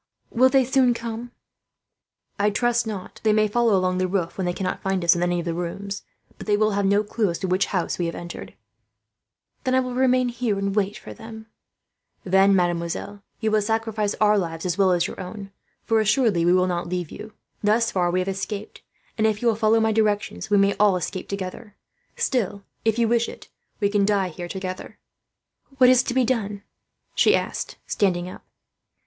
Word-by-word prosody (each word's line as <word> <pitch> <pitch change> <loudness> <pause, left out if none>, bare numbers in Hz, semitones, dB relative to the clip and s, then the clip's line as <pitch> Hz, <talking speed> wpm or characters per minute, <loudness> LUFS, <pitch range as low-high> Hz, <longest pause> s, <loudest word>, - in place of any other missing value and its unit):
Will 255 +2 +5
they 265 -1 +4
soon 255 -1 +3
come?" 235 +1 -6 1.1
"I 205 +1 +3
trust 240 +2 +1
not," 205 -4 -3
Philip - - -15
said. - - -19
"They 215 -1 +4
may 215 0 +3
follow 230 -1 +2
along 185 0 0
the 185 - +1
roof, 180 -3 -2
when 190 - -2
they 175 - +1
cannot 185 +1 -3
find 190 -2 -1
us 170 - +6
in 170 - -2
any 175 0 +1
of 170 - -3
the 170 - -1
rooms; 195 +4 -4 0.4
but - - -9
they 205 -1 +3
will 215 0 +2
have 200 -1 +1
no 200 +1 +3
clue 210 -1 -1
as 170 - -2
to 190 - -3
which 185 +2 +1
house 180 -2 -2
we 175 - 0
have 165 - -4
entered." 175 0 -8 1.1
"I 260 0 +2
will 255 -1 -2
remain 255 0 +2
here 235 -4 -1
and 195 0 -2
wait 205 -1 0
for - - -10
them," 220 0 -10
she 220 - -49
said. 180 - -8
"Then, 195 +1 +5
mademoiselle, 175 +3 -1 0.2
you 220 -1 +1
will 215 0 +3
sacrifice 220 -1 -1
our 210 -1 +3
lives, 165 -2 -4
as 175 -2 0
well 195 -1 +3
as 175 -1 +2
your - - -6
own; 195 +1 -8 0.3
for 225 -1 +2
assuredly 215 -5 +2
we 175 - +4
shall 185 0 +4
not 175 -1 -2
leave 180 -3 -3
you. 215 0 -9 0.3
Thus 220 +2 +2
far 180 -2 +1
we 180 +1 +1
have 185 - -4
escaped 200 +2 -5 0.4
and, 220 - +4
if 215 +1 -1
you - - +2
will 225 - +1
follow 220 +1 +3
my 220 0 +2
directions, 215 0 0
we 205 - +4
may 200 0 +4
all 205 -2 +5
escape 180 +1 -5
together. 200 +2 -6 0.4
Still, 205 -5 -1 0.2
if 225 0 +1
you 235 -1 +3
wish 235 0 +1
it, - - -12 0.3
we 205 - +2
can 200 -1 +2
die 200 -3 +1
here 175 +1 -7
together." 185 0 -6 0.8
"What 255 -1 +7
is 255 -1 +5
to 245 - -4
be 260 -1 +3
done?" 210 -5 -2 0.5
she - - +4
asked, - - -3
standing 180 -3 0
up. 185 - -10
205 Hz, 215 wpm, -23 LUFS, 185-225 Hz, 1.1 s, What